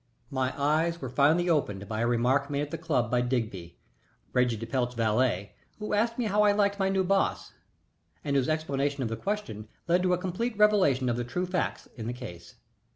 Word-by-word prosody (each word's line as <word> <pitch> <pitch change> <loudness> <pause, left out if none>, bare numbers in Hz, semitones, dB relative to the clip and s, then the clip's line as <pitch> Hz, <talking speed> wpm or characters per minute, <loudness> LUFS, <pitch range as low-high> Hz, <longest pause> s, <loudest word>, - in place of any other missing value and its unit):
My 130 0 -1
eyes 160 +4 +1
were 130 -5 -6
finally 155 +6 +3
opened 105 - 0
by 110 +1 -3
a 120 - +2
remark 125 +4 +2
made 140 0 -1
at 145 0 -4
the 165 - -3
club 135 -9 0
by 125 -1 +3
Digby, 110 -9 -3 0.6
Reggie 125 -2 +2
de 115 - -5
Pelt's 125 +1 -1
valet, 110 -3 +1 0.2
who 210 -1 -4
asked 230 +3 +1
me 245 - 0
how 210 0 +2
I 205 -1 +5
liked 200 0 +1
my 195 0 +2
new 190 -1 +2
boss, 195 +1 0 0.7
and 140 -1 -1
whose 135 0 +2
explanation 145 -3 -1
of 115 - -2
the 115 - -2
question 115 - -4 0.2
led 175 +1 +3
to 180 0 +2
a - - +2
complete 195 +6 -3
revelation 195 -12 +4
of 120 -1 0
the 120 - -1
true 180 +10 -2
facts 180 0 -2
in 115 -1 -5
the 120 - -2
case. 90 -9 -10
140 Hz, 210 wpm, -28 LUFS, 120-180 Hz, 0.7 s, I